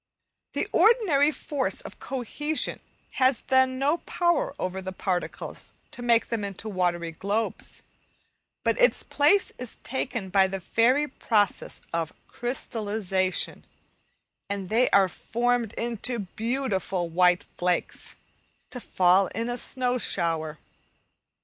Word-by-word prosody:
The -, -, -1 dB
ordinary 380 Hz, -, +4 dB
force 285 Hz, -2 st, -1 dB
of -, -, -11 dB
cohesion 295 Hz, +4 st, -2 dB, 0.4 s
has 260 Hz, -1 st, +4 dB
then 260 Hz, -1 st, +3 dB
no 285 Hz, +5 st, +2 dB
power 345 Hz, -5 st, 0 dB
over 185 Hz, +1 st, -3 dB
the 190 Hz, 0 st, -5 dB
particles 185 Hz, -1 st, -4 dB, 0.2 s
to 245 Hz, -, -9 dB
make 235 Hz, -1 st, +3 dB
them 230 Hz, -3 st, -2 dB
into 200 Hz, +2 st, -5 dB
watery 175 Hz, -4 st, -1 dB
globes, 200 Hz, +7 st, -3 dB, 0.8 s
but -, -, +1 dB
its -, -, +4 dB
place 300 Hz, +8 st, +3 dB
is 250 Hz, -2 st, -5 dB
taken 235 Hz, -5 st, -3 dB
by 190 Hz, 0 st, +4 dB
the 195 Hz, 0 st, -4 dB
fairy 250 Hz, +10 st, +2 dB
process 215 Hz, -6 st, 0 dB
of 165 Hz, -1 st, -2 dB
"crystallization," 210 Hz, -6 st, -1 dB, 0.9 s
and 200 Hz, -2 st, -4 dB
they 235 Hz, +3 st, +3 dB
are 195 Hz, -1 st, +5 dB
formed 235 Hz, +3 st, -1 dB
into 235 Hz, +1 st, -1 dB
beautiful 205 Hz, -3 st, -2 dB
white 180 Hz, +1 st, +3 dB
flakes, 180 Hz, 0 st, -2 dB, 0.6 s
to 250 Hz, -, -5 dB
fall 185 Hz, -3 st, +3 dB
in 230 Hz, +2 st, -1 dB
a 245 Hz, -, -1 dB
snow 250 Hz, 0 st, +1 dB
shower. 165 Hz, -6 st, -1 dB
225 Hz, 120 wpm, -26 LUFS, 190-260 Hz, 0.9 s, are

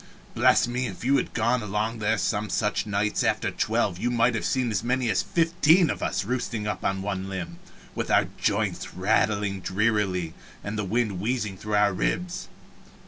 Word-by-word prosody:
Bless -, -, +4 dB
me, 125 Hz, +1 st, -1 dB
if -, -, -8 dB
you 135 Hz, +2 st, +4 dB
had -, -, -2 dB
gone 120 Hz, +1 st, +2 dB
along 105 Hz, +2 st, -2 dB
there 110 Hz, +1 st, +1 dB
some 105 Hz, +1 st, -1 dB
such 105 Hz, +3 st, 0 dB
nights 105 Hz, +1 st, 0 dB
after -, -, 0 dB
twelve 85 Hz, -, 0 dB
you 120 Hz, -, 0 dB
might 120 Hz, 0 st, +2 dB
have 115 Hz, -, -2 dB
seen 125 Hz, -3 st, 0 dB
as 110 Hz, -, -1 dB
many 125 Hz, -1 st, +1 dB
as 95 Hz, -, +2 dB
fifteen 165 Hz, 0 st, +3 dB
of -, -, -5 dB
us 95 Hz, -, -1 dB
roosting 115 Hz, -2 st, -2 dB
on 95 Hz, -2 st, -2 dB
one 95 Hz, -1 st, -3 dB
limb, 85 Hz, -3 st, -6 dB, 0.3 s
with -, -, -3 dB
our -, -, +4 dB
joints -, -, -1 dB
rattling 100 Hz, +1 st, +1 dB
drearily 95 Hz, -4 st, 0 dB, 0.3 s
and 100 Hz, +1 st, -4 dB
the 105 Hz, -, -1 dB
wind 105 Hz, -1 st, -1 dB
wheezing 105 Hz, -1 st, -1 dB
through 105 Hz, +2 st, -3 dB
our 105 Hz, -1 st, +3 dB
ribs! 180 Hz, -, -2 dB
105 Hz, 180 wpm, -26 LUFS, 100-120 Hz, 0.3 s, Bless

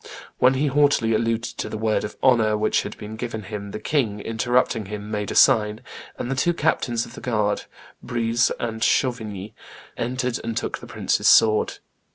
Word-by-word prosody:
When 130 Hz, +1 st, +5 dB
he 140 Hz, +3 st, +1 dB
haughtily 140 Hz, -5 st, +3 dB
alluded 115 Hz, +1 st, 0 dB, 0.2 s
to -, -, -3 dB
the -, -, -5 dB
word 110 Hz, 0 st, 0 dB
of 105 Hz, -, -6 dB
honor 115 Hz, -5 st, +4 dB
which 105 Hz, +1 st, +1 dB
had -, -, -7 dB
been 105 Hz, +1 st, -8 dB
given 110 Hz, -1 st, -5 dB
him, 100 Hz, 0 st, -6 dB
the 105 Hz, -, -6 dB
king, 110 Hz, -4 st, 0 dB
interrupting 115 Hz, 0 st, 0 dB
him, 105 Hz, +1 st, -7 dB
made 105 Hz, -1 st, -2 dB
a -, -, -4 dB
sign; 105 Hz, 0 st, +4 dB, 0.4 s
and 120 Hz, -, -4 dB
the -, -, 0 dB
two 175 Hz, +6 st, +1 dB
captains 120 Hz, -7 st, 0 dB
of 115 Hz, -, -13 dB
the -, -, -10 dB
guard, 105 Hz, -4 st, 0 dB, 0.4 s
Breze 120 Hz, 0 st, +1 dB
and 115 Hz, -1 st, -4 dB
Chavigny, 110 Hz, -6 st, 0 dB, 0.4 s
entered 125 Hz, 0 st, -2 dB
and 115 Hz, -1 st, -3 dB
took -, -, -3 dB
the -, -, -11 dB
prince's -, -, 0 dB
sword. 110 Hz, -1 st, +5 dB
115 Hz, 185 wpm, -23 LUFS, 105-125 Hz, 0.4 s, When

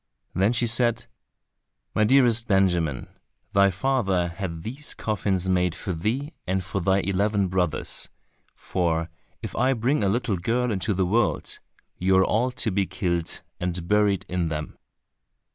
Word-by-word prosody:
Then 100 Hz, +4 st, +2 dB
she 120 Hz, 0 st, +2 dB
said, 120 Hz, 0 st, +2 dB, 0.9 s
"my 110 Hz, -, +2 dB
dearest 120 Hz, -2 st, +5 dB
Benjamin, 90 Hz, -, +1 dB, 0.5 s
thy 100 Hz, 0 st, +5 dB
father 95 Hz, -4 st, 0 dB
has 85 Hz, +3 st, -13 dB
had 85 Hz, -4 st, -4 dB
these 135 Hz, +6 st, -3 dB
coffins 95 Hz, -4 st, -1 dB
made 90 Hz, -2 st, +1 dB
for 95 Hz, -, -4 dB
thee 125 Hz, -, -2 dB
and 95 Hz, 0 st, 0 dB
for 95 Hz, +2 st, -3 dB
thy 95 Hz, +2 st, +2 dB
eleven 100 Hz, 0 st, 0 dB
brothers, 90 Hz, -4 st, -1 dB, 0.5 s
for 85 Hz, -2 st, -1 dB, 0.3 s
if 110 Hz, -, -6 dB
I 130 Hz, +2 st, +2 dB
bring 125 Hz, +1 st, 0 dB
a 100 Hz, -, +2 dB
little 115 Hz, -1 st, 0 dB
girl 120 Hz, +7 st, 0 dB
into 100 Hz, +1 st, -1 dB
the 95 Hz, 0 st, +1 dB
world, 110 Hz, +4 st, 0 dB, 0.4 s
you 95 Hz, +1 st, +3 dB
are 95 Hz, -, +5 dB
all 120 Hz, +4 st, +1 dB
to 120 Hz, -3 st, 0 dB
be 95 Hz, 0 st, 0 dB
killed 85 Hz, -3 st, -2 dB, 0.2 s
and 90 Hz, -1 st, -3 dB
buried 105 Hz, -1 st, +2 dB
in 90 Hz, -1 st, -1 dB
them." 75 Hz, -1 st, -5 dB
95 Hz, 155 wpm, -25 LUFS, 90-115 Hz, 0.9 s, dearest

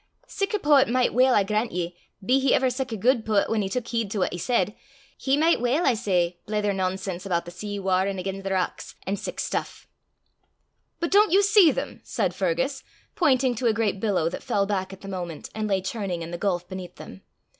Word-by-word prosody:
sic 395 Hz, +2 st, -3 dB
a 420 Hz, -, +1 dB
poet 295 Hz, -, +4 dB
micht 250 Hz, 0 st, +2 dB
weel, 255 Hz, +1 st, +4 dB
I 205 Hz, -, +4 dB
grant 215 Hz, +3 st, -1 dB
ye, 175 Hz, 0 st, -3 dB, 0.3 s
be 255 Hz, +5 st, +4 dB
he 270 Hz, -1 st, +3 dB
ever 260 Hz, -1 st, +2 dB
sic 260 Hz, 0 st, -3 dB
a 220 Hz, -, -3 dB
guid 240 Hz, +3 st, +2 dB
poet 215 Hz, -2 st, +1 dB
whan 220 Hz, -1 st, +1 dB
he 195 Hz, -, -2 dB
tuik 240 Hz, +3 st, -3 dB
heed 230 Hz, -3 st, -1 dB
to 210 Hz, -, -4 dB
what 185 Hz, -, +1 dB
he -, -, -3 dB
said, 205 Hz, +1 st, +1 dB, 0.4 s
he 270 Hz, +1 st, +1 dB
micht 320 Hz, -3 st, +3 dB
weel, 260 Hz, +8 st, +1 dB
I 260 Hz, -, +4 dB
say, 180 Hz, -6 st, 0 dB
blether 210 Hz, -1 st, 0 dB
nonsense 190 Hz, -1 st, -2 dB
aboot 170 Hz, -2 st, 0 dB
the 175 Hz, -, -8 dB
sea 205 Hz, +3 st, -6 dB
warrin' 190 Hz, 0 st, 0 dB
again' 195 Hz, +1 st, -4 dB
the 195 Hz, -, -4 dB
rocks, 185 Hz, -1 st, -2 dB
an' 195 Hz, +2 st, -1 dB
sic -, -, -6 dB
stuff." -, -, -3 dB, 1.1 s
"But 340 Hz, -1 st, -2 dB
don't 415 Hz, 0 st, +5 dB
you 395 Hz, +3 st, +5 dB
see 405 Hz, -4 st, +6 dB
them?" -, -, -5 dB
said -, -, -1 dB
Fergus, -, -, -1 dB, 0.3 s
pointing 270 Hz, -9 st, +3 dB
to 240 Hz, +1 st, -1 dB
a 225 Hz, -, +3 dB
great 215 Hz, -3 st, 0 dB
billow 195 Hz, -6 st, +1 dB
that -, -, -6 dB
fell 205 Hz, -6 st, 0 dB
back 195 Hz, -2 st, -2 dB
at 195 Hz, -, -11 dB
the 195 Hz, -, -9 dB
moment, 175 Hz, -5 st, -6 dB
and 215 Hz, -1 st, -2 dB
lay 195 Hz, -2 st, +1 dB
churning 190 Hz, -5 st, -3 dB
in 165 Hz, -, -7 dB
the 175 Hz, -, -5 dB
gulf 180 Hz, -3 st, -1 dB
beneath 185 Hz, -1 st, -8 dB
them. 95 Hz, -, -11 dB
210 Hz, 225 wpm, -25 LUFS, 190-255 Hz, 1.1 s, see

